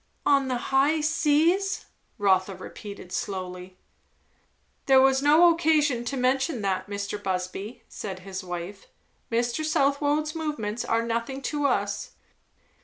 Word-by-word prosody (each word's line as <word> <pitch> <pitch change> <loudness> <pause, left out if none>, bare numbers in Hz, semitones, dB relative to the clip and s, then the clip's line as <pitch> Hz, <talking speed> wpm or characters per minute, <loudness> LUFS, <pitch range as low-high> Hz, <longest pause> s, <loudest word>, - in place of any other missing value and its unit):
"On 275 -2 +4
the 255 -1 0 0.2
high 285 +4 +4
seas!" 320 +5 +2 0.3
Rotha 190 -1 +2
repeated 195 0 -10
slowly. 185 -1 -5 1.1
"There 265 -1 +7
was 265 0 +4
no 320 +4 +6
occasion 300 -7 +2
to 270 +3 -3
mention 260 0 +1
that, 190 0 -1
Mr. 200 0 -4
Busby," 195 +5 -4
said 190 -3 -7
his 190 +1 -6
wife. 180 +2 -7 0.4
"Mr. 240 +6 0
Southwode's 295 0 +1
movements 245 -9 -3
are 230 0 +1
nothing 235 +3 -2
to 290 +1 0
us." 205 -5 -1
240 Hz, 120 wpm, -26 LUFS, 200-290 Hz, 1.1 s, There